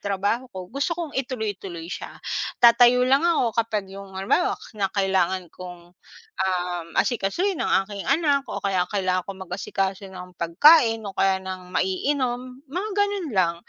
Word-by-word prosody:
trabaho 205 +6 -1
ko 185 0 -9
gusto 285 +5 -1
kong 335 -4 -5
ituloy-tuloy 205 -10 -4
siya 170 - -7 0.4
tatayo 245 +1 +6
lang 270 +2 +4
ako 325 -9 +2
kapag 215 -3 -2
yung 195 -1 -10
halimbawa 195 - +1 0.2
na 200 -2 -1
kailangan 190 -3 0
kong 175 -1 -11 0.5
ah 180 -2 -1 0.2
asikasuhin 295 - 0
ang 195 - +2
aking 200 0 -7
anak 285 -1 +3
o - - -5
kaya 185 -2 +1
kailangan 185 -3 0
kong 195 -1 -7
mag-asikaso 195 +1 -3
ng 180 -1 -10
pagkain 225 - +5
o 200 - -5
kaya 195 0 +2
ng 185 -1 -7
maiinom, 250 +7 -2
mga 360 +9 -4
ganun 405 -4 0
lang, 170 -2 +3
200 Hz, 150 wpm, -24 LUFS, 185-260 Hz, 0.5 s, tatayo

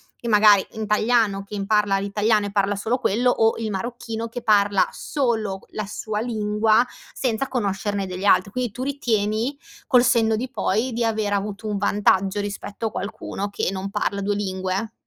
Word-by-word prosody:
che 235 - -6
magari 210 -2 +6
italiano, 215 -1 +1
che 200 0 -6
parla 205 -1 +2
l'italiano 210 +2 +1
e 205 - -4
parla 200 0 +1
solo 225 +5 0
quello, 245 +1 +1
o 225 -2 +2
il 225 -1 -3
marocchino 230 +2 -4
che 245 +2 -6
parla 205 -3 +3
solo 225 -8 -1
q - - -27
la 215 - -4
sua 210 +1 -4
lingua, 215 -1 +2 0.3
senza 255 +1 -2
conoscerne 205 -3 -1
delle 185 +2 -5
altre. 200 -1 +4
Quindi 250 0 -2
tu 250 +5 -5
ritieni, 235 -2 -1 0.3
col 250 -2 +5
senno 225 -2 +3
di 250 +3 -3
poi, 240 0 -1
di 235 +1 -1
aver 215 -2 0
avuto 200 +1 -3
un 210 -1 -1
vantaggio 200 0 +2
rispetto 205 +1 -5
a - - -5
qualcuno 200 0 -4
che 200 - -1
non 190 +1 -4
parla 200 0 -1
2 205 +1 0
lingue? 190 +1 -2
210 Hz, 175 wpm, -23 LUFS, 200-230 Hz, 0.3 s, magari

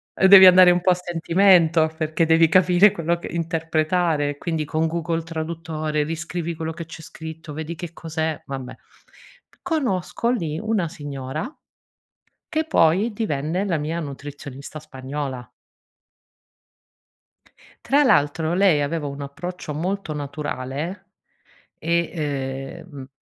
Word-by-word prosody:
ehm, 190 - +4
devi 190 -1 +10
andare 180 0 +8
un 175 0 +1
po' 185 - +4
a - - +4
sentimento, 170 -2 +3
perché 155 +1 0
devi 165 0 +5
capire 185 +3 +5
quello 170 0 -1
che - - -7
interpretare, 160 -2 0
quindi 160 -1 -2
con 155 +2 0
Google 165 0 -2
Traduttore 160 -2 -3
riscrivi 165 +2 -4
quello 160 0 -4
che 165 0 -7
c'è 160 0 -10
scritto, 160 -1 -9
vedi 160 +2 -5
che 175 -1 -7
cos'è 160 -1 -3
vabbè. 135 -2 -6 0.9
Conosco 235 - -1
lì 165 -9 -2
una 215 -4 0
signora, 145 - -6 1.0
che 315 0 -1
poi 200 - +3
divenne 175 -3 -2
la 175 -5 0
mia 155 +3 -3
nutrizionista 140 0 -8
spagnola 135 -3 -6 2.4
Tra 285 +2 +4
l'altro, 160 - +2
lei 180 -6 +4
aveva 150 +1 -2
un 140 0 -5
approccio 155 +4 -6
molto 180 +3 -3
naturale 145 +3 -5 0.7
e, 170 0 0 0.7
ehm, 140 -7 -10
160 Hz, 120 wpm, -22 LUFS, 150-175 Hz, 2.4 s, devi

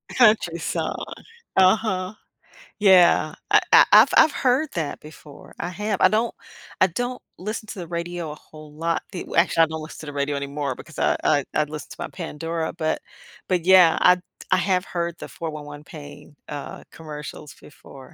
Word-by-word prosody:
Country 215 -8 +4
song. - - -2 0.6
Uh-huh. 190 0 +2 0.7
Yeah. 190 -4 +5
I - - +6
I - - +8
I've - - +8
I've 310 - +7
heard 265 +4 +1
that 160 -4 -3
before, 150 -1 -14
I 175 - -3
have. 210 +2 -3
I 185 - +7
don't 220 +3 0 0.5
I 185 - +7
don't 245 +8 -4 0.2
listen 215 +3 -5
to 205 - -8
the 170 - -6
radio 170 -1 -4
a - - -8
whole 155 0 -15
lot. 165 +2 -2
The 180 - -5
we - - -6
actually, 170 -1 +4
I - - +6
don't 160 0 -6
listen 155 - -10
to 155 - -9
the 145 - -6
radio 140 0 -1
anymore 140 -1 -3
because 155 - -11
I - - +2
I 145 -3 +2
I'd 150 -1 0
listen 150 0 -8
to - - -8
my - - -4
Pandora, 165 -1 -4
but 155 0 -2 0.5
but 180 -3 0
yeah, 185 -3 +6
I 180 - +6 0.3
I - - +5
have 185 -1 +1
heard 170 -1 -3
the - - -8
411 150 -2 -7
PAIN, 145 0 -12
uh, 145 -1 -7
commercials 150 -1 -9
before. 135 -2 -15
165 Hz, 180 wpm, -23 LUFS, 150-185 Hz, 0.7 s, I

